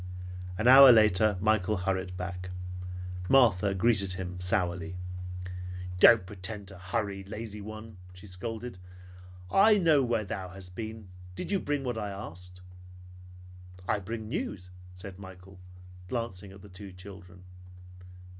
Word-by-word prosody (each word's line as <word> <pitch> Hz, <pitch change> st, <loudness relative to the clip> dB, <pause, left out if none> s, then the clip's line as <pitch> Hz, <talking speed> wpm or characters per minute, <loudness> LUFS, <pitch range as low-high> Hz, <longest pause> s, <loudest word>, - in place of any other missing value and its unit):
An 110 Hz, -, +1 dB
hour 135 Hz, +1 st, +11 dB
later 110 Hz, -2 st, +5 dB
Michael 105 Hz, 0 st, +2 dB
hurried 95 Hz, 0 st, -2 dB
back. 90 Hz, 0 st, -5 dB, 0.8 s
Martha 105 Hz, -7 st, +5 dB
greeted 100 Hz, -2 st, +3 dB
him 90 Hz, -1 st, -5 dB
sourly. 90 Hz, -1 st, -1 dB, 1.0 s
"Don't 105 Hz, -1 st, +8 dB
pretend 100 Hz, +1 st, -7 dB
to 95 Hz, -, -11 dB
hurry, 100 Hz, 0 st, -2 dB
lazy 105 Hz, +1 st, -7 dB
one," 110 Hz, 0 st, -9 dB
she 90 Hz, +2 st, -13 dB
scolded. 110 Hz, +3 st, -5 dB, 0.7 s
"I 210 Hz, +2 st, +6 dB
know 160 Hz, -7 st, +4 dB
where 115 Hz, -3 st, 0 dB
thou 95 Hz, -1 st, -5 dB
hast 90 Hz, -1 st, -11 dB
been. 110 Hz, -1 st, -7 dB, 0.3 s
Did 90 Hz, -, -4 dB
you 195 Hz, -, +2 dB
bring 145 Hz, -4 st, -2 dB
what 120 Hz, -3 st, -2 dB
I 105 Hz, -, -3 dB
asked?" 90 Hz, -2 st, -9 dB, 1.3 s
"I 105 Hz, -, +1 dB
bring 110 Hz, +3 st, -5 dB
news," 90 Hz, -4 st, -4 dB, 0.2 s
said 90 Hz, +1 st, -9 dB
Michael, 95 Hz, 0 st, -12 dB, 0.5 s
glancing 105 Hz, -6 st, -4 dB
at 95 Hz, 0 st, -14 dB
the 105 Hz, -, -12 dB
two 95 Hz, +1 st, -9 dB
children. 90 Hz, -1 st, -12 dB
100 Hz, 130 wpm, -29 LUFS, 90-110 Hz, 1.3 s, hour